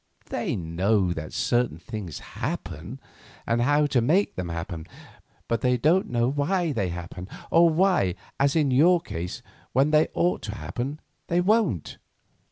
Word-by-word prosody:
They - - -1
know 90 +3 +1
that 80 -2 -6
certain 120 -9 0
things 95 - -6
happen, - - -5 0.5
and 115 +1 +1
how 145 +4 +3
to 135 -4 +2
make 175 - +2
them 90 -2 -4
happen; 85 -1 -5 0.6
but 115 -1 0
they 125 -1 +2
don't 160 +10 +2
know 120 -1 +1
why 155 +5 0
they 100 -9 -1
happen, 85 +1 -7 0.2
or 170 0 +6
why, 165 - +2 0.2
as 140 +2 +3
in 150 -4 +3
your 170 +7 +5
case, 90 - -6 0.3
when 135 +4 +3
they 155 0 +5
ought 175 +1 +1
to 105 0 -5
happen, 135 +7 -4 0.3
they 170 - +2
won't." 185 - +1
125 Hz, 155 wpm, -26 LUFS, -, 0.6 s, or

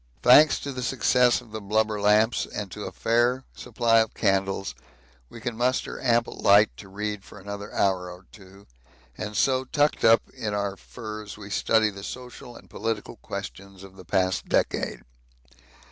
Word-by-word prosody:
Thanks 145 +5 +7
to 140 - -4
the 130 -1 -5
success 125 0 +2
of 115 -3 -17
the 110 0 -6
blubber 105 +1 0
lamps 105 +3 +3
and 105 -3 -6
to 105 - -7
a - - -5
fair 120 +3 +1
supply 115 -2 +2
of 110 -1 0
candles, 95 -1 0 0.6
we - - -11
can 120 +1 -4
muster 125 +3 -1
ample 120 -2 +1
light 105 +2 +5
to 95 - -11
read 105 0 -4
for 105 - -13
another 100 +1 -7
hour 95 -2 0
or 90 +1 -12
two, 95 0 -16 0.5
and 105 0 -5
so 130 -1 +2
tucked 145 +3 0
up 115 0 +6
in 105 -2 -3
our 100 -1 -2
furs 110 -2 -9
we 105 -1 -10
study 110 +1 +2
the 100 -1 -10
social 125 +1 -9
and - - -14
political 110 0 -4
questions 95 +9 -8
of 95 -1 -13
the 95 - -12
past 95 +1 0
decade. - - 0
105 Hz, 170 wpm, -25 LUFS, 100-120 Hz, 0.6 s, Thanks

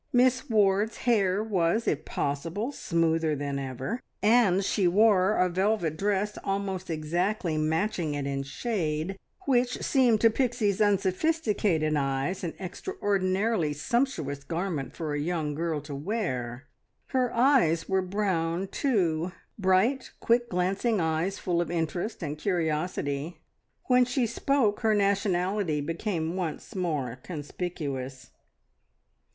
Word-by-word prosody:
Miss 255 +2 +3
Ward's 210 0 +2
hair 205 -4 +3
was, 205 +1 +1
if 155 +1 0
possible, 165 - -2
smoother 165 - +1
than 140 -1 -3
ever, 135 - -4 0.2
and 205 -4 +4
she 195 -3 +2
wore 200 +1 +4
a 180 - +4
velvet 185 -2 0
dress 205 +3 -1
almost 195 -2 -2
exactly 170 +4 -1
matching 160 +1 0
it 145 -1 -3
in 140 0 -2
shade, 160 - -2 0.3
which 250 -3 +1
seemed 250 -5 +3
to 230 - +6
Pixie's 225 -5 0
unsophisticated 200 - +1
eyes 140 +6 -1
an 170 - -3
extraordinarily 195 - -1
sumptuous 150 - -1
garment 165 -4 -3
for 155 -3 -3
a 145 - -1
young 155 -1 -1
girl 160 0 -1
to 145 0 -8
wear. 140 - -3 0.5
Her 255 -2 +1
eyes 235 - +3
were 190 0 +2
brown, 185 -2 -1
too 180 - 0 0.3
bright, 195 +8 +2
quick 240 +1 +2
glancing 195 +5 0
eyes 165 +3 0
full 175 -2 0
of 170 - -3
interest 175 +5 -2
and 150 -1 -4
curiosity. 160 -3 -2 0.4
When 250 -1 +4
she 250 0 0
spoke 235 -1 +1
her 220 -2 +2
nationality 195 -4 +1
became 165 +2 -2
once 175 +2 -4
more 145 -9 -2
conspicuous. 145 -5 -5
185 Hz, 125 wpm, -28 LUFS, 155-215 Hz, 0.5 s, to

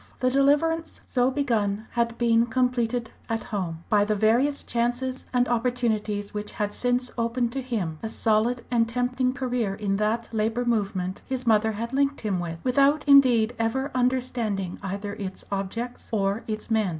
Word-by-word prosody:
The 255 0 +2
deliverance 295 +4 +2
so 250 0 +2
begun 220 -7 0
had 235 -1 0
been 235 -1 +3
completed 245 -1 0 0.2
at 225 0 -1
home, 170 -6 -4
by 205 -1 +4
the 215 +1 0
various 235 +7 +2
chances 245 +2 -1
and 250 -1 +2
opportunities 225 -4 -1
which 210 0 -5
had 205 -1 -2
since 245 0 0
opened 235 +1 0
to 270 +2 -3
him 200 -11 -3
a 220 - -3
solid 230 +2 +1
and 230 -2 +2
tempting 250 +1 0
career 245 -7 -1
in 195 -1 -1
that 220 +2 0
Labour 225 +2 0
movement 200 -5 -1
his 260 -1 -3
mother 220 -1 +3
had 230 +4 -5
linked 280 +1 +1
him 200 -5 -1
with, 170 -1 -4
without 280 +4 +3
indeed 245 -5 +6
ever 265 +5 0
understanding 245 -7 -1
either 200 +1 -4
its 195 -2 -7
objects 215 +5 -4
or 200 0 0
its 215 +1 -5
men. 220 -3 +2
230 Hz, 160 wpm, -26 LUFS, 210-250 Hz, 0.2 s, indeed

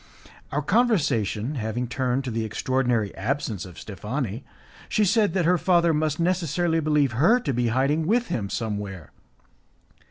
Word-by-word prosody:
Our 150 +1 -1
conversation 145 - +1
having 120 -1 -3
turned 130 +1 -1
to 130 - -4
the 115 0 -1
extraordinary 120 -1 0
absence 110 -3 -3
of 90 -3 -12
Steffani, 110 - -4 0.5
she 215 - +2
said 205 0 +2
that 180 -3 +2
her 180 +1 +3
father 170 -2 +3
must 155 0 0
necessarily 170 -1 +1
believe 150 -4 +2
her 165 - +4
to 140 - -2
be 120 0 +1
hiding 140 +7 +1
with 235 +4 +2
him 100 -4 -2
somewhere. 100 -7 -4
135 Hz, 150 wpm, -25 LUFS, 110-165 Hz, 0.5 s, her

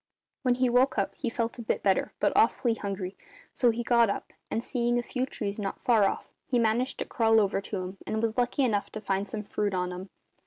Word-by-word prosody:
"When 250 -3 +2
he 255 0 +2
woke 250 +3 +3
up - - 0
he 250 - -3
felt 230 -1 -2
a - - -3
bit 225 - -1
better, 190 -2 +2
but - - +2
awfully 230 +1 +3
hungry, 195 -3 -4 0.4
so 245 - +3
he 235 +1 -1
got 235 -2 +4
up - - -4 0.2
and, 225 - -1
seeing 240 -2 0
a 240 - 0
few 255 +2 -2
trees 205 -4 -4
not 195 -2 -3
far 225 -5 +5
off, - - -1 0.2
he 250 - +1
managed 235 +3 +1
to - - -3
crawl 225 -2 +3
over 200 -1 +1
to 200 +1 -5
'em, 185 +1 -5
and 220 - -1
was 225 0 0
lucky 250 +2 +1
enough 215 -5 +1
to - - -4
find 195 -1 -1
some 210 +1 -4
fruit 205 -1 -1
on 180 0 -1
'em. 185 +2 -7
225 Hz, 235 wpm, -28 LUFS, 200-240 Hz, 0.4 s, far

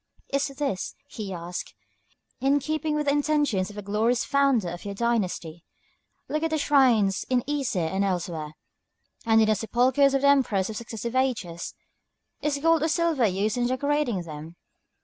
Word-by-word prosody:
"Is 280 0 +2
this," 275 -11 -2
he 210 -4 -7
asks, 175 0 -6 0.6
"in 275 +2 +3
keeping 310 +2 -2
with 300 0 -1
the 280 - +3
intentions 290 -10 +1
of 205 - -11
the 205 - -6
glorious 220 +4 +1
founder 275 -9 +2
of 175 +1 -7
your 200 -1 -5
dynasty? 190 -8 -1 0.6
Look 305 - -2
at 325 - 0
the 315 - 0
shrines 250 -10 +3
in 250 -2 +2
Isé 270 - -1
and 190 +4 0
elsewhere, 170 -5 -2 0.7
and 225 0 +5
at - - +4
the 215 - +3
sepulchres 255 +6 +2
of 270 - +1
the - - +5
Emperors 225 -8 +3
of 215 - -6
successive 235 +1 -5
ages. 220 -11 -1 0.7
Is 295 -1 0
gold 325 +2 +3
or 320 - +2
silver 320 -6 +2
used 200 +4 -1
in 240 - +2
decorating 260 -6 0
them?" 160 +1 -9
235 Hz, 170 wpm, -26 LUFS, 195-280 Hz, 0.7 s, and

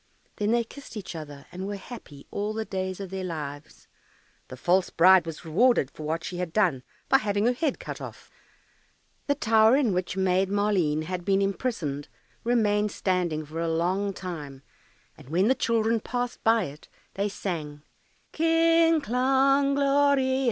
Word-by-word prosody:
Then 210 0 0
they 235 +1 +3
kissed 260 0 -11
each 195 -4 -7
other, 145 -3 -9
and 185 +2 -5
were 205 - -3
happy 190 - -11
all 205 +1 -2
the 220 0 -2
days 190 -1 -4
of 195 -2 -7
their 190 -1 -4
lives. 150 -4 -7 0.6
The 130 - -9
false 180 +7 +2
bride 185 -1 +5
was 165 +1 -7
rewarded 180 - +3
for - - -12
what 160 +2 -2
she 180 - -5
had 180 -2 -3
done 175 -10 +2 0.3
by 270 - +5
having 205 -1 0
her 245 - +3
head 290 +2 -1
cut - - -7
off. - - -10 1.0
The 285 - +2
tower 220 -2 +4
in 250 -9 +2
which 180 +1 -2
Maid 190 0 +2
Maleen 195 -7 +1
had 180 +2 -4
been 195 +1 +2
imprisoned 195 - -2 0.4
remained 210 -3 +2
standing 175 -5 -1
for 155 +2 -7
a 165 0 -1
long 185 +5 0
time, 150 -8 -7 0.6
and - - -14
when 185 +7 +2
the - - +6
children 230 -2 +1
passed 245 +2 -4
by 225 -1 +4
it 145 -2 -9 0.3
they 200 +1 -1
sang, 150 -7 -5 0.5
"Kling, 330 0 +3
klang, 270 +2 +2
gloria. 280 -2 +3
195 Hz, 165 wpm, -26 LUFS, 170-240 Hz, 1.0 s, the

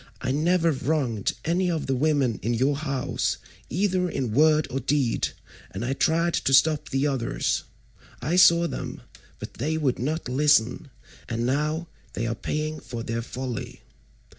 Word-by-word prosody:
I 130 - -2
never 165 +3 +2
wronged 130 -6 -1
any 180 +3 +1
of 165 -3 -1
the 135 - 0
women 135 -4 +1
in 120 +3 0
your 135 +5 +2
house 140 -3 -1 0.3
either 185 -1 +1
in 125 -8 -2
word 155 +5 +4
or 135 - -1
deed, 135 -2 +1 0.4
and 100 +5 -5
I 130 - 0
tried 165 +4 +1
to 135 - +3
stop 155 +2 +3
the 135 +1 0
others. 135 -5 -1 0.5
I 165 - -1
saw 170 -2 +6
them, - - -6 0.4
but - - -8
they 160 +2 -2
would 140 -5 0
not 155 +6 -2
listen, 135 -1 +2 0.4
and 115 0 -1
now 150 +5 0 0.3
they 115 - -2
are 115 - -1
paying 155 +5 -3
for 120 -1 -6
their 115 +1 -2
folly. 125 -1 -6
145 Hz, 160 wpm, -25 LUFS, 125-160 Hz, 0.5 s, saw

